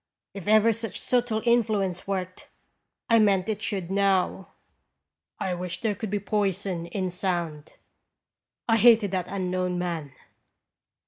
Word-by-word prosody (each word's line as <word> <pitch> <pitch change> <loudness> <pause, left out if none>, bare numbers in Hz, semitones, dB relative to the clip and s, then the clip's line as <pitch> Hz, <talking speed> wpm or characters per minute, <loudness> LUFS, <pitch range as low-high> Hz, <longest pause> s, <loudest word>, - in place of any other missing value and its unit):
If 195 -2 -8
ever 215 +1 +5
such 225 -1 -5
subtle 240 -3 0
influence 210 -7 +1
worked, 185 -2 -4 0.6
I 230 -1 +5
meant 200 -3 +3
it 215 -1 -2
should 190 -5 -2
now. 195 -1 +1 0.9
I 185 - -1
wished 180 0 -5
there 220 -2 +1
could 210 +1 -5
be 205 +1 -1
poison 195 -4 -1
in 185 +1 -3
sound. 175 -5 -3 0.9
I 225 -1 +4
hated 225 -3 +5
that 185 -2 -2
unknown 185 -1 -2
man. 165 -6 -4
195 Hz, 130 wpm, -26 LUFS, 180-215 Hz, 0.9 s, ever